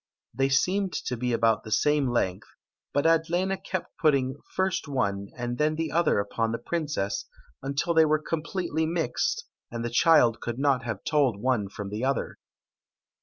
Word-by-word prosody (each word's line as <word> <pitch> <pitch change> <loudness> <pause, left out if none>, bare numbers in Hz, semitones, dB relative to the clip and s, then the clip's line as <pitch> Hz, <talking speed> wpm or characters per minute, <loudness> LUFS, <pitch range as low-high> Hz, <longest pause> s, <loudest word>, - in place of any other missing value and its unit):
They 135 0 +1
seemed 185 +8 +1
to 125 - -3
be 125 +1 -2
about 115 -1 +2
the 110 - -9
same 145 +3 +2
length, 95 -6 -1 0.4
but 145 +2 0
Adlena 175 +4 +1
kept 185 -3 -5
putting 140 -3 +2 0.2
first 185 -4 0
one 100 -8 -1
and 120 0 -3
then 155 +1 +2
the 160 -1 -2
other 170 -5 +2
upon 110 +3 -1
the 115 - -1
princess, 120 - -2 0.4
until 140 +5 -1
they 160 -1 +6
were 155 0 +3
completely 160 +1 -2
mixed, 320 - -1 0.2
and 115 0 -4
the 120 - -3
child 135 -4 +5
could 120 0 -4
not 135 -2 +2
have 110 -4 -4
told 135 -9 +2
one 115 -4 0
from 100 0 -6
the 105 +4 -3
other. 135 +1 -1
140 Hz, 170 wpm, -27 LUFS, 115-165 Hz, 0.4 s, they